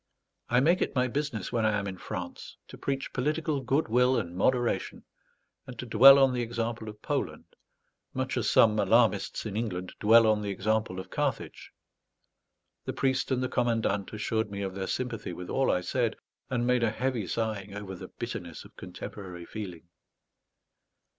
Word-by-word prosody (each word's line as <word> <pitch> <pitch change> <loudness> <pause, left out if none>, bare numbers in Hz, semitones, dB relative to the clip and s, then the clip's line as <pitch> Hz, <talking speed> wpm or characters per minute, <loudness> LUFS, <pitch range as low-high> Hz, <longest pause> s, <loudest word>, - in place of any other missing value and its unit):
I 125 +1 +4
make 170 +6 +3
it - - -1
my 125 -1 +2
business, 140 -6 -3
when 115 -2 0
I 110 -1 +2
am 100 - -3
in 95 -2 -6
France, 90 -1 -7
to - - -9
preach 135 -1 -3
political 150 +2 -1
good 135 +5 +1
will 125 +3 +3
and 85 +1 -3
moderation, 120 +5 0 0.6
and 125 - -9
to 125 - -5
dwell 130 +4 +9
on 135 -2 +4
the 125 - -1
example 115 -1 -3
of 105 0 -12
Poland, - - -2 0.7
much - - -2
as - - 0
some 110 -1 +5
alarmists 115 -3 +2
in 105 -2 -4
England 95 -5 -3
dwell 115 +2 +6
on 110 -1 +3
the 100 - -3
example 105 -1 -1
of 95 - -9
Carthage. - - -3 1.2
The - - -3
priest 135 -1 0
and 130 -1 0
the - - +1
commandant 115 -5 0
assured 110 0 -1
me 100 0 -4
of 95 -1 -3
their 95 0 -4
sympathy 120 -7 -3
with 90 +1 -7
all 135 0 +2
I 90 - +2
said, 115 +5 0 0.3
and 120 -2 0
made 125 0 +2
a 115 - +3
heavy 120 -2 -2
sighing 105 -3 -3
over 100 -2 -6
the 95 0 -8
bitterness 95 -10 -7
of - - -17
contemporary 90 -4 -8
feeling. 90 -6 -7
110 Hz, 175 wpm, -29 LUFS, 100-125 Hz, 1.2 s, dwell